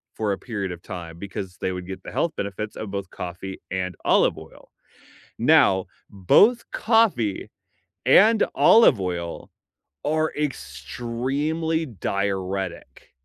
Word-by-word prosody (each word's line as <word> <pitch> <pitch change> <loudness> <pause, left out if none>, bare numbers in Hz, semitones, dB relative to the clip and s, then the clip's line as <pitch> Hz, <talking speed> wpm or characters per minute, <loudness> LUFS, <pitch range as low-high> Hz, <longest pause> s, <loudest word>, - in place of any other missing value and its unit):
for 105 -2 -1
a 95 - -1
period 100 -6 -4
of 85 -1 -8
time, 85 -3 -8
because 95 -1 -7
they 95 - -1
would 90 -1 -6
get 95 0 -7
the - - -8
health 155 +7 0
benefits 100 +2 -4
of 110 - -6
both 100 -2 -4
coffee 90 +2 -7
and 90 -2 -2
olive - - +3
oil. - - -14 0.7
Now, 95 -1 +4 0.2
both 205 - +4
coffee 215 - +2 0.6
and 220 +2 +6
olive 220 - +6
oil 85 -2 -4 0.5
are 155 +1 0
extremely 140 - -2
diuretic. 95 - -4
100 Hz, 120 wpm, -24 LUFS, 90-145 Hz, 0.7 s, and